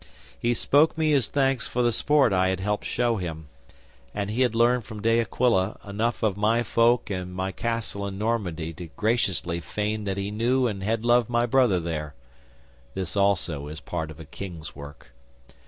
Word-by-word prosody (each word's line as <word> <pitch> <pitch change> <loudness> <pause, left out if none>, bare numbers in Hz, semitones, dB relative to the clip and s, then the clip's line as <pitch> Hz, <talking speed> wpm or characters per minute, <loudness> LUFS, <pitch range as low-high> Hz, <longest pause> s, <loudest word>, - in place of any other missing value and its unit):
'He 120 0 +1
spoke 150 +7 +3
me 155 -1 +2
his 135 -6 +2
thanks 135 -3 +1
for 125 - 0
the 120 - +3
sport 145 0 +3
I 95 0 +3
had 95 -1 0
helped 105 +2 -2
show 120 -2 0
him, 80 -5 -6 0.7
and 100 0 -2
he 120 +4 -1
had 125 -3 +2
learned 120 +1 +3
from 105 -2 -9
De 115 +1 +3
Aquila 115 -3 +1
enough 110 +4 -1
of 105 -4 +2
my 110 +3 +2
folk 115 0 +2
and 90 -1 -4
my 95 +1 -2
castle 115 -3 -3
in 95 -1 -6
Normandy 95 -8 -2
to 85 +1 -8
graciously 95 -3 0
feign 105 +4 -3
that 95 -1 -2
he 100 +1 -3
knew 125 +4 +1
and 105 -5 -2
had 110 +3 -1
loved 120 -1 +4
my 120 0 +2
brother 120 -6 +3
there. 75 -4 -4 0.8
(This, 95 -1 -3
also, 90 -7 +1
is 75 +1 -7
part 80 -2 -4
of 80 0 -11
a 80 - -9
king's 85 0 -8
work.) 70 -2 -11
105 Hz, 190 wpm, -25 LUFS, 90-120 Hz, 0.8 s, loved